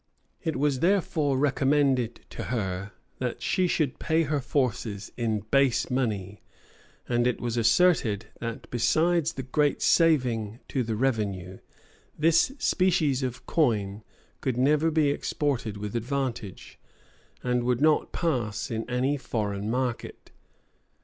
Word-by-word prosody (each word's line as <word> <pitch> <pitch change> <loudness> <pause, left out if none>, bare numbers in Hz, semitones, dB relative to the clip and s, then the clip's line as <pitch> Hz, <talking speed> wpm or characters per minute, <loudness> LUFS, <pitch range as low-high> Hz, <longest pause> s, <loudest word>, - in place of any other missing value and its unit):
It 160 -3 -2
was 140 0 +1
therefore 160 -6 +1
recommended 135 -3 +1
to - - -6
her, 100 -4 -3 0.3
that 125 -2 -3
she 185 -1 +1
should 155 -6 0
pay 160 +1 +2
her 150 -1 0
forces 120 -7 -2
in 110 -3 -1
base 135 -3 +3
money; 105 -6 -2 0.7
and 120 0 +2
it 125 - 0
was 120 -1 -2
asserted 115 - +3
that, 115 -1 -5
besides 160 +7 +2
the 130 - -5
great 145 +3 +1
saving 125 - +2
to 135 - 0
the 115 -2 -2
revenue, 100 -7 -1 0.6
this 165 - +3
species 170 - +2
of 130 -1 -4
coin 110 -9 0 0.4
could 130 -3 -1
never 150 +5 +3
be 155 -3 +2
exported 130 -8 -2
with 105 +2 -5
advantage, 120 -4 -4 0.6
and 125 -1 +1
would 125 0 +1
not 155 +1 +3
pass 125 -8 -2
in 115 +1 -3
any 130 +4 +1
foreign 105 -5 -3
market. 125 0 -3
125 Hz, 130 wpm, -27 LUFS, 115-145 Hz, 0.7 s, base